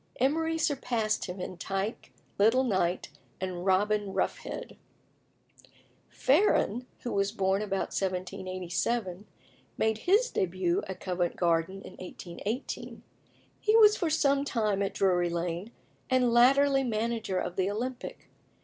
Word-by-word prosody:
Emery 320 +5 +1
surpassed 245 -8 0
him 180 0 -6
in 185 - -5
Tyke, 195 +4 -3 0.3
Little 225 +6 +5
Knight, 185 -9 0 0.3
and 185 0 -4
Robin 205 +1 +2
Roughhead. - - -3 1.3
Farren, 260 - +2
who 240 - -4
was 200 0 +1
born 190 +1 +1
about 195 -2 -2
1787, 185 +2 -2 0.5
made 220 0 +1
his 420 - +3
début 180 -1 0
at 190 - -6
Covent 180 -2 -1
Garden 170 +3 0
in - - -10
1818. 185 +7 -6 0.6
He 430 +1 +2
was 425 -1 +7
for 340 - -1
some 280 -3 +2
time 215 -7 0
at 200 - -1
Drury 180 -2 +2
Lane, 170 +4 -3 0.4
and 255 -2 +3
latterly 270 +3 +5
manager 225 -4 -1
of 180 - -2
the 190 0 +1
Olympic. 245 +5 -5
205 Hz, 120 wpm, -29 LUFS, 185-250 Hz, 1.3 s, was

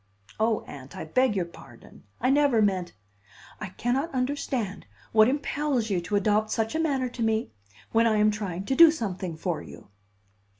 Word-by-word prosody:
"Oh, 220 0 +1
Aunt, 135 -1 -11
I - - -5
beg 245 +7 +2
your 185 -3 0
pardon. 135 -8 -16
I 255 +3 +2
never 280 -4 +3
meant 190 -4 0 0.4
" - - -21
"I 210 - -3
cannot 250 - -1
understand 255 -5 -2 0.2
what 220 0 +6
impels 280 -4 -1
you 180 -3 +1
to 180 +4 -3
adopt 210 +1 +2
such 225 0 -1
a 315 - -1
manner 275 -5 0
to 240 - -8
me, 225 0 0 0.4
when 230 +1 +4
I 215 -1 +2
am 210 0 +4
trying 195 -3 -4
to 265 - 0
do 335 +1 +9
something 190 - -4
for 170 -1 -2
you." - - -13
220 Hz, 180 wpm, -26 LUFS, 190-260 Hz, 0.4 s, do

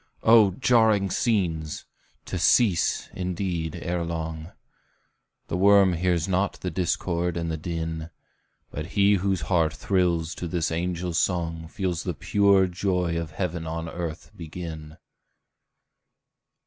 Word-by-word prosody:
Oh, 110 -4 +6
jarring 110 -6 +3
scenes! 85 -9 -1 0.4
to - - -4
cease, 100 -9 +3
indeed, 90 -3 -3
ere 90 -1 -1
long; 80 0 -5 1.0
The - - -3
worm 100 -1 +5
hears 85 -1 0
not 95 +1 +1
the 90 - -5
discord 85 0 -1
and 85 -1 -2
the 80 - -2
din; 80 -1 -4 0.6
But 75 +2 -5
he 100 0 +5
whose 95 -1 0
heart 80 0 +1
thrills 85 -4 0
to 90 - -2
this 85 -1 -1
angel 90 +1 -2
song, 85 -2 -1
Feels 90 0 -2
the 90 -3 -4
pure 100 +4 +3
joy 90 -2 -1
of 85 -1 -3
heaven 85 0 -4
on 80 +1 -4
earth 85 -1 -6
begin! 80 -2 -8
85 Hz, 125 wpm, -25 LUFS, 80-95 Hz, 1.0 s, Oh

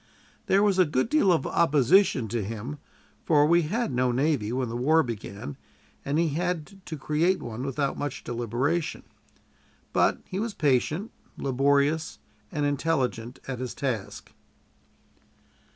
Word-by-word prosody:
There 195 +1 +4
was 200 -2 +2
a 185 - +6
good 145 - 0
deal 275 -11 +4
of 160 -6 +2
opposition 155 - +3
to 115 0 -1
him, 115 +8 -6 0.4
for 150 -2 +4
we 170 +3 +4
had 210 - -1
no 125 0 +1
navy 130 -4 +1
when 130 0 -1
the 115 - -5
war 155 +7 +3
began, 100 - -6 0.5
and 140 +2 -1
he 165 0 +2
had 180 +4 -3
to 160 - -5
create 160 +7 +1
one 120 +1 -6
without 135 +1 -2
much 145 -1 -4
deliberation; 120 +8 -2 0.9
but - - +3
he 190 - -4
was 220 0 -3
patient, 150 - +1 0.3
laborious, 140 +4 +1 0.3
and 150 -4 -1
intelligent 135 -5 -1
at 130 -2 -4
his 125 -2 -5
task. 125 -8 -4
145 Hz, 140 wpm, -27 LUFS, 125-165 Hz, 0.9 s, a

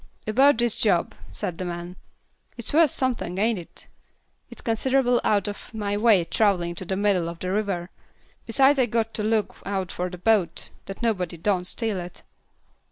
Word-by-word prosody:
"About 265 +5 +4
this 240 -1 +3
job," 175 -6 +1 0.2
said 170 - -4
the 185 - -3
man, 175 +1 -6 0.6
"it's 235 - -4
worth 320 0 +6
somethin', 245 -9 -2
ain't 220 0 +1
it? 170 - -13 0.6
It's - - -10
considerable 245 +2 +2
out 205 -2 +2
of 205 +4 -7
my 205 -2 -1
way, 205 -5 +4
travelin' 180 -4 +1
to 185 - -5
the 190 +2 -2
middle 195 -4 +1
of 170 - -7
the 185 +2 -4
river; 195 -4 -2 0.6
besides 270 +5 +4
I've 245 -2 +3
got 225 0 0
to 210 - -2
look 215 -1 0
out 195 -2 -3
for 180 +1 -3
that 180 0 -10
boat, 215 -6 +1 0.2
that 195 +5 -7
nobody 185 -7 -1
don't 180 +1 0
steal 220 -1 -2
it." 175 0 -9
205 Hz, 175 wpm, -25 LUFS, 180-230 Hz, 0.6 s, worth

